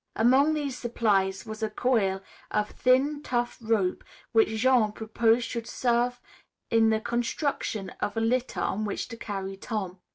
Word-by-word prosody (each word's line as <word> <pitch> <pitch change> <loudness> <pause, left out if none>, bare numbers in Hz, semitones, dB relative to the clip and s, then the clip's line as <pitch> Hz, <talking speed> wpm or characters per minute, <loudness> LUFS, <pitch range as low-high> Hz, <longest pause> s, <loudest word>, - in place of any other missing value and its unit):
Among 265 +7 +4
these 285 -4 -2
supplies 205 -6 0
was 215 0 -7
a 220 - 0
coil 205 -8 +1 0.3
of 210 0 -1
thin, 275 +4 +2
tough 240 -3 -2
rope 220 -5 0 0.3
which 225 -1 +5
Jean 220 -1 +3
proposed 225 +2 +1
should 235 -1 -5
serve 245 0 0 0.5
in 225 -1 +5
the 220 0 +2
construction 235 -3 -2
of 205 - -2
a - - +3
litter 250 +3 0
on 215 - -1
which 205 +2 -3
to 230 - -6
carry 195 -3 -5
Tom. 195 -4 -4
225 Hz, 155 wpm, -27 LUFS, 210-245 Hz, 0.5 s, which